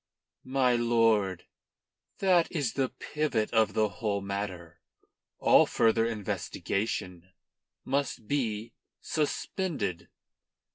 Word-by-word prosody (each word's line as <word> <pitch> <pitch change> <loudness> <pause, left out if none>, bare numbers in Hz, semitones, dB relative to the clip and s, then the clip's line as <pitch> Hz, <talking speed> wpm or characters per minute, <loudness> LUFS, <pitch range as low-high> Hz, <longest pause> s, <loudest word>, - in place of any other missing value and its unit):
"My 130 -2 +3
lord, 115 -5 +2 0.7
that 180 -3 +3
is 145 -9 -1
the 135 -2 0
pivot 145 -9 -2
of 110 -3 +3
the 110 -1 +3
whole 100 +2 -2
matter. 100 -4 -5 0.6
All - - +5
further 115 0 +3
investigation 95 -4 -3 0.6
must 135 -4 -1
be 115 -5 -2 0.3
suspended." 150 - -2
115 Hz, 90 wpm, -29 LUFS, 100-135 Hz, 0.7 s, All